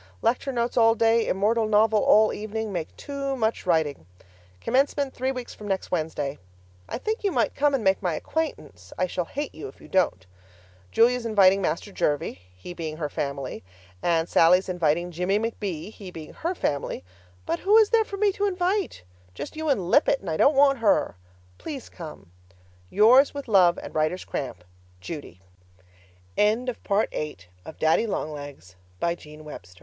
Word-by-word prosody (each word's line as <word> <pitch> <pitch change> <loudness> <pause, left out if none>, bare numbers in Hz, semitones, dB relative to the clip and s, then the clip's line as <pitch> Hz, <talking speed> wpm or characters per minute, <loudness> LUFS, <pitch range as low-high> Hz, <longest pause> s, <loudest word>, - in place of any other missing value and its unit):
Lecture 250 +3 +1
notes 240 -1 -1
all 225 -1 +5
day, 225 0 +3
immortal 215 +4 +1
novel 215 0 +4
all 215 0 +5
evening, 215 0 -4
make 170 -3 -5
too 275 -1 -4
much 220 -5 -1
writing. 155 - 0 0.5
Commencement 275 - +1
three 260 +1 -1
weeks 250 -2 -6
from 210 - -10
next 195 -1 -2
Wednesday. 155 -4 -2 0.5
I - - -3
think 435 - -3
you 400 - +1
might - - +1
come 290 0 +2
and 250 - -2
make 190 -1 +2
my 175 -4 0
acquaintance 100 - -4
I 185 - +2
shall 180 -1 -3
hate 290 - -5
you 160 - -7
if 135 - -14
you - - -14
don't! 155 - +1 0.7
Julia's 245 +1 +3
inviting 200 -4 +4
Master 175 +3 -2
Jervie, 145 - -1 0.2
he 135 - -8
being 160 -3 -5
her 150 -2 -3
family, 140 -6 -4 0.4
and 165 -1 +1
Sallie's 180 +3 +4
inviting 175 -1 0
Jimmie 180 +4 0
McB., 210 -5 -4
he 200 -3 -10
being 160 -3 -10
her 345 +3 -3
family, 140 - -2 0.4
but 165 - -1
who 415 +3 +4
is 435 -2 +5
there 455 -1 +5
for 400 -2 -7
me 410 0 +3
to 410 +1 -1
invite? 370 - -1 0.3
Just - - -7
you 315 0 -2
and 195 -10 0
Lippett, 285 -2 +4
and 180 - -4
I - - 0
don't 280 - +4
want 275 -1 +5
her. 210 - +2 0.4
Please 280 -6 -7
come. 155 - -10 0.6
Yours, 250 +8 +5
with 280 -2 -6
love 185 -5 +5
and - - -8
writer's 155 +4 0
cramp. 110 -10 -5 0.4
Judy 120 - -8 0.9
LOCK 230 +4 +1
WILLOW, 200 +2 +3
19th 150 -6 -5
June 90 0 -21
Dear 160 - -8
Daddy 160 +8 +2
Long 155 -6 -2
Legs, 145 -11 -10 0.2
I'm 170 - +1
educated! 150 - -10
200 Hz, 175 wpm, -25 LUFS, 155-250 Hz, 0.9 s, all